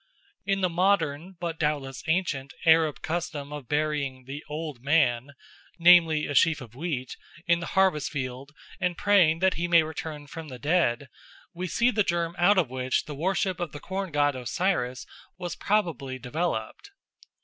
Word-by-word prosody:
In 195 -1 +1
the 185 - +3
modern, 180 -2 +1
but 170 -2 -4
doubtless 145 -4 -2
ancient, 160 -5 -1
Arab 160 -2 +4
custom 155 -3 -3
of 145 -4 -7
burying 145 -3 -1
"the 140 +3 -7
Old 150 -4 -5
Man," 140 -3 +2 0.4
namely, 170 -3 +6
a 145 - -3
sheaf 160 +2 +4
of 120 -5 -11
wheat, 130 -3 -4 0.3
in 170 -2 +3
the 170 - -5
harvest 185 -7 +3
field 135 0 -5 0.3
and 180 -1 -1
praying 180 -5 +4
that 190 0 +4
he 175 - 0
may 170 -1 +5
return 155 -1 -6
from 160 +2 -8
the 130 -3 -8
dead, 145 -3 +1 0.5
we 180 +1 -4
see 235 +8 +2
the 210 - +1
germ 170 -3 0
out 195 +4 +5
of 175 -6 +3
which 130 +1 -1
the 150 - -7
worship 185 +3 -1
of 175 -5 -4
the 145 - -7
corn 190 +2 -4
god 145 -1 +2
Osiris 130 -1 -1 0.3
was 175 -1 -5
probably 165 - -1
developed. 135 - -3
155 Hz, 165 wpm, -27 LUFS, 140-175 Hz, 0.5 s, namely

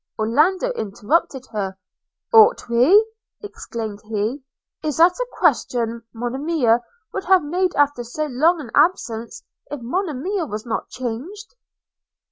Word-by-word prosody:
– - - -65
Orlando 315 - +2
interrupted 260 - -1
her: 195 -3 -3 0.6
'Ought 450 +1 +6
we!' 270 - +5 0.4
exclaimed 235 - -6
he. 220 +5 -2 0.4
'Is 300 -3 -2
that 340 +2 +6
a - - -1
question, 235 -1 +1
Monimia 245 +1 +1 0.3
would - - -4
have 375 -2 +4
made 360 +4 -1
after 285 -4 +2
so 260 +6 -3
long 310 +5 +2
an 255 -7 -8
absence, 235 -10 0 0.3
if 290 0 -5
Monimia 335 - -2
was 215 0 -6
not 230 - -3
changed?' 270 - -6
280 Hz, 125 wpm, -21 LUFS, 230-360 Hz, 0.6 s, Ought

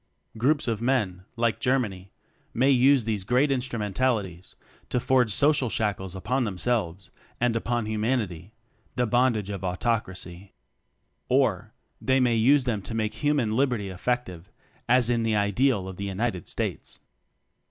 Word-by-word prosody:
Groups 135 +6 +1
of 115 -2 -1
men 105 -8 0
(like 115 -2 0
Germany) 105 -8 -1 0.4
may 130 +4 +4
use 130 -1 +4
these 105 -4 -2
great 125 +7 +2
instrumentalities 110 -6 -2 0.3
to 125 - 0
forge 125 -2 +2
social 140 +1 +2
shackles 100 -4 -2
upon 125 +8 -1
themselves, 100 -3 -2 0.3
and 120 -1 +1
upon 115 0 -1
Humanity 110 -5 -2 0.4
the 125 - +1
bondage 120 -4 +1
of 100 -2 -6
autocracy. 95 -1 -3 0.8
Or, - - +1 0.3
they 130 0 +2
may 125 -2 +3
use 130 +5 +4
them 115 -5 -1
to 105 +4 -6
make 110 -1 -1
hu 150 0 0
man 120 -7 0
Liberty 125 -6 0
effective, 95 -3 -3 0.4
as 125 -1 +4
is 120 -1 +1
the 110 -1 +1
ideal 105 0 +1
of 95 -1 -8
the 100 - -4
United 100 -2 -2
States. - - -3
115 Hz, 140 wpm, -26 LUFS, 100-125 Hz, 0.8 s, may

